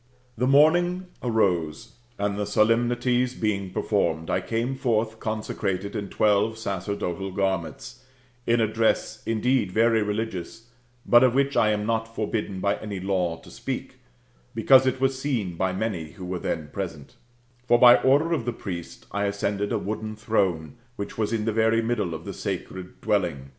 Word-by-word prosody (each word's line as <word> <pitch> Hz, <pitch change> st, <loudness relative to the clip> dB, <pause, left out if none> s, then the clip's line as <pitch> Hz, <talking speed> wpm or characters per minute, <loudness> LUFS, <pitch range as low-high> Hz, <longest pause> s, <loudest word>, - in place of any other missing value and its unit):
The 125 Hz, +3 st, 0 dB
morning 175 Hz, +6 st, +4 dB, 0.2 s
arose, 100 Hz, -3 st, 0 dB, 0.2 s
and 100 Hz, 0 st, -1 dB
the 105 Hz, 0 st, -2 dB
solemnities 120 Hz, +3 st, +2 dB
being 100 Hz, -3 st, -1 dB
performed, 85 Hz, -5 st, -1 dB
I -, -, +1 dB
came 115 Hz, +3 st, -2 dB
forth 115 Hz, -4 st, 0 dB
consecrated 100 Hz, -2 st, -3 dB
in 100 Hz, -2 st, -4 dB
twelve 105 Hz, +1 st, +2 dB
sacerdotal 95 Hz, -2 st, -3 dB
garments, 95 Hz, -4 st, -3 dB, 0.4 s
in 120 Hz, 0 st, +3 dB
a 115 Hz, -, +4 dB
dress 110 Hz, 0 st, 0 dB
indeed 115 Hz, -2 st, +1 dB
very 115 Hz, +2 st, +3 dB
religious, 105 Hz, +1 st, -4 dB, 0.4 s
but 120 Hz, +1 st, +6 dB
of 125 Hz, -1 st, +3 dB
which 140 Hz, +1 st, +2 dB
I 110 Hz, -, +4 dB
am 105 Hz, -1 st, 0 dB
not 115 Hz, 0 st, -2 dB
forbidden 105 Hz, -3 st, -2 dB
by 100 Hz, +1 st, +1 dB
any 105 Hz, -3 st, -6 dB
law 90 Hz, -3 st, -1 dB
to -, -, -14 dB
speak, -, -, -6 dB, 0.6 s
because 130 Hz, -1 st, +6 dB
it 130 Hz, -, 0 dB
was 135 Hz, 0 st, 0 dB
seen 115 Hz, -11 st, -1 dB
by 95 Hz, +2 st, 0 dB
many 95 Hz, -5 st, -3 dB
who 90 Hz, -, -9 dB
were 90 Hz, 0 st, -3 dB
then 80 Hz, -3 st, -3 dB
present 80 Hz, -7 st, -6 dB, 0.5 s
For, 120 Hz, -, +5 dB
by 120 Hz, 0 st, +8 dB
order 145 Hz, +6 st, +3 dB
of 135 Hz, -9 st, -1 dB
the 120 Hz, -, -1 dB
priest, 90 Hz, -6 st, -7 dB
I 100 Hz, 0 st, -1 dB
ascended 100 Hz, 0 st, -1 dB
a -, -, +1 dB
wooden 110 Hz, +1 st, -4 dB
throne, 95 Hz, -, -1 dB, 0.2 s
which 100 Hz, -, -6 dB
was 110 Hz, -1 st, -1 dB
in 110 Hz, -2 st, -1 dB
the 110 Hz, -, 0 dB
very 110 Hz, +1 st, +2 dB
middle 110 Hz, -8 st, -1 dB
of -, -, -9 dB
the -, -, -5 dB
sacred 95 Hz, -1 st, -6 dB
building 90 Hz, -8 st, +1 dB
\Le. 70 Hz, +1 st, -13 dB
110 Hz, 170 wpm, -25 LUFS, 95-115 Hz, 0.6 s, by